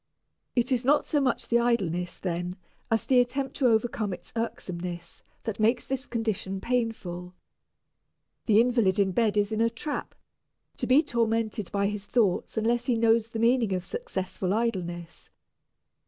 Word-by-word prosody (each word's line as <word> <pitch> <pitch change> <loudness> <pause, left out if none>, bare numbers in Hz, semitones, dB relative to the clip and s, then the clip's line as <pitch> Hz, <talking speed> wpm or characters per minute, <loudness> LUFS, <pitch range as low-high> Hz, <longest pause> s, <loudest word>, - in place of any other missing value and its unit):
It 245 +2 +2
is 250 -1 +2
not 285 +4 +3
so 295 - +1
much 255 -3 0
the 235 - +3
idleness, 180 -8 0
then, 175 0 -3 0.3
as 225 0 +1
the 255 -2 +5
attempt 265 +2 0
to 265 - +3
overcome 220 -3 +1
its - - -10
irksomeness, 180 -6 -4 0.2
that 220 -2 -4
makes 225 +3 +2
this 270 0 -3
condition 220 -4 -2
painful. 190 -7 -2 1.1
The 215 -2 +6
invalid 230 -5 +3
in 195 -2 +3
bed 215 +1 +1
is 205 +1 +2
in 220 0 0
a 230 - +4
trap, 260 +6 -5 0.6
to - - -2
be 270 +5 +6
tormented 225 - -1
by 200 0 +1
his 205 0 -2
thoughts 215 -3 +1
unless 235 +2 +1
he 245 -3 +2
knows 225 0 +3
the 230 - -6
meaning 230 -2 +3
of 180 -1 -2
successful 190 - -3
idleness. 175 -7 -3
225 Hz, 155 wpm, -27 LUFS, 190-240 Hz, 1.1 s, The